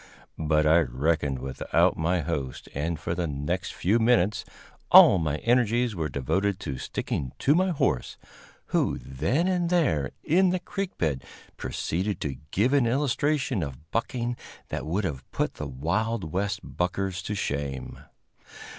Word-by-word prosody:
But 75 0 +2
I 80 +2 +6
reckoned 70 0 0
without 65 +1 +1
my 85 +2 +1
host, 70 -5 -4
and 80 +3 -2
for 85 - -2
the 85 0 -1
next 75 +6 -2
few 105 +6 +2
minutes 110 -4 +3 0.5
all 95 - +9
my 75 -2 -1
energies 120 0 +3
were 80 -3 -2
devoted 95 +10 0
to 65 -2 -4
sticking 65 +1 -3
to 145 - +3
my 185 +4 +3
horse, 140 - 0 0.6
who - - +2
then 80 - -1
and 180 -2 +1
there 125 - +2
in 185 +4 +4
the 185 +1 0
creek 195 +1 -5
bed 70 -5 -1 0.3
proceeded 95 +5 -2
to 70 -3 -3
give 110 - +2
an 135 -4 +4
illustration 135 -2 +1
of 75 +1 -7
bucking 120 +1 -1 0.3
that - - -4
would 95 +7 0
have 70 -8 -3
put - - -1
the 75 - -5
wild 85 - -2
West 100 +3 -1
buckers 95 +1 -2
to 105 - -2
shame. 70 -7 -3
90 Hz, 150 wpm, -27 LUFS, 75-120 Hz, 0.6 s, all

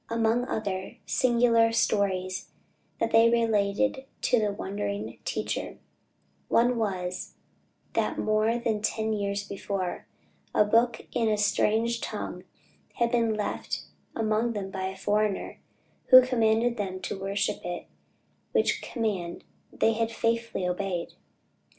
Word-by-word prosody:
Among 230 +1 +1
other 195 -6 -3
singular 235 -2 +3
stories 195 -5 0 0.5
that 230 - 0
they 225 +1 +6
related 230 +3 +1 0.2
to 245 - +3
the 210 -1 +1
wondering 110 - -4
"teacher," - - -3 0.7
one 240 0 +3
was, 185 -4 -3 0.6
that - - 0
more 215 +2 +2
than 230 -3 -1
ten 220 +1 0
years 200 -1 -2
before, 195 -2 -4 0.5
a 210 - +5
book 230 +1 +2
in 230 -2 +1
a 215 - +2
strange 220 +3 +1
tongue - - -5 0.5
had 235 0 +1
been 230 -3 +2
left 210 -1 -3 0.3
among 225 +1 +1
them 195 -2 -4
by 190 -1 -3
a 190 0 -6
foreigner, 210 0 0 0.5
who 255 -1 +9
commanded 235 -1 +2
them 190 -3 -3
to 190 +1 -4
worship 200 +1 -1
it; 175 0 -4 0.7
which - - +2
command 200 -8 -3 0.3
they 225 - +2
had 225 0 -1
faithfully 230 -4 -1
obeyed. 180 -1 -2
215 Hz, 125 wpm, -28 LUFS, 195-230 Hz, 0.7 s, who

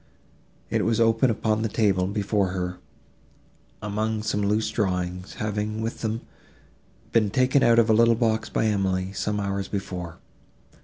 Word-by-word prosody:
It - - +1
was 115 0 +1
open 115 +2 +3
upon 110 -1 0
the 110 - -1
table, 100 -4 +2
before 100 0 0
her, 90 -1 -3 1.0
among 105 +1 -2
some 105 -1 -1
loose 105 +2 +1
drawings, 90 -3 -2
having, 105 0 -2
with 115 +1 -4
them, 110 0 -2 0.9
been 110 -3 +3
taken 130 +5 +3
out 115 -2 +5
of 115 -1 +5
a 110 - +4
little 115 +1 +5
box 110 -1 0
by - - 0
Emily, 95 -3 0
some 105 +1 -2
hours 100 -1 -2
before. 90 -4 -5
105 Hz, 150 wpm, -25 LUFS, 100-110 Hz, 1.0 s, out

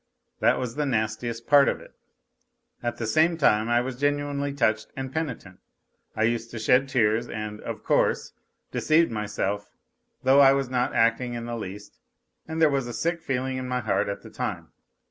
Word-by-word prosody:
That - - +3
was 125 -2 -3
the 150 +2 -1
nastiest 115 0 -2
part 145 -1 +6
of - - -2
it. - - -15 0.9
At 120 -1 -3
the 115 - -3
same 160 +9 +3
time 110 -7 +3
I 120 0 +3
was 125 0 -5
genuinely 145 0 0
touched 110 -6 +1
and 135 0 -5
penitent, 125 - -4 0.6
I 110 - 0
used 115 0 0
to 120 - -7
shed 125 +5 +3
tears 115 -3 +1
and, 105 -1 -5
of - - -6
course, - - +1 0.4
deceived 160 0 +3
myself, 105 -1 -3 0.5
though 135 +2 +5
I 135 -1 +8
was 135 -2 -1
not 125 -1 0
acting 115 +2 +2
in 115 0 -5
the 120 0 -4
least 105 -2 -8 0.5
and 160 0 -4
there 160 - +6
was 135 -3 0
a 120 - -5
sick 170 +4 -1
feeling 130 -2 -2
in 130 0 -4
my 125 0 -1
heart 110 -2 0
at 100 - -5
the - - -12
time. - - -4
125 Hz, 185 wpm, -26 LUFS, 110-140 Hz, 0.9 s, I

